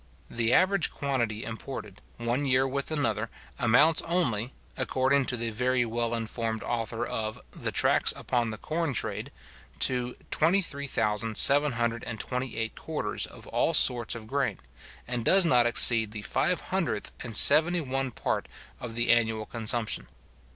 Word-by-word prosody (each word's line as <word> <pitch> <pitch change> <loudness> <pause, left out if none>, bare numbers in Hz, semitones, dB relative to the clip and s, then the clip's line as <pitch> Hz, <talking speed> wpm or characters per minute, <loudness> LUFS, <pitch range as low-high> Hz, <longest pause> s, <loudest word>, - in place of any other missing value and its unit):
The 115 0 0
average 190 +5 +3
quantity 120 -6 -3
imported, 110 -3 -8 0.2
one 120 +4 -2
year 130 0 +2
with 140 +1 -2
another, 115 -8 -1 0.3
amounts 145 +8 +4
only, 130 - -1 0.2
according 135 +1 0
to 125 - 0
the 115 0 -2
very 125 +2 0
well 115 0 -2
informed 115 0 -4
author 115 0 -3
of 110 -2 -4
the - - -5
Tracts - - +3
upon 120 -2 -2
the 110 - -6
Corn 155 +1 -3
Trade, - - -2 0.5
to 125 -1 +2 0.2
23,728 125 - 0
quarters - - -3
of - - -13
all - - +1
sorts 120 -2 +4
of 115 -2 -9
grain, 125 -4 -2 0.5
and 120 -1 -3
does 190 +8 +5
not 125 -6 +3
exceed 115 -2 +5
the 105 -1 -7
five 180 - 0
hundredth 165 - -2
and 115 -3 0
seventy 160 +5 +7
one 135 -1 -3
part 120 - -3 0.3
of 115 -2 -7
the 120 0 +1
annual 110 -2 +1
consumption. 115 0 -1
120 Hz, 135 wpm, -27 LUFS, 115-140 Hz, 0.5 s, seventy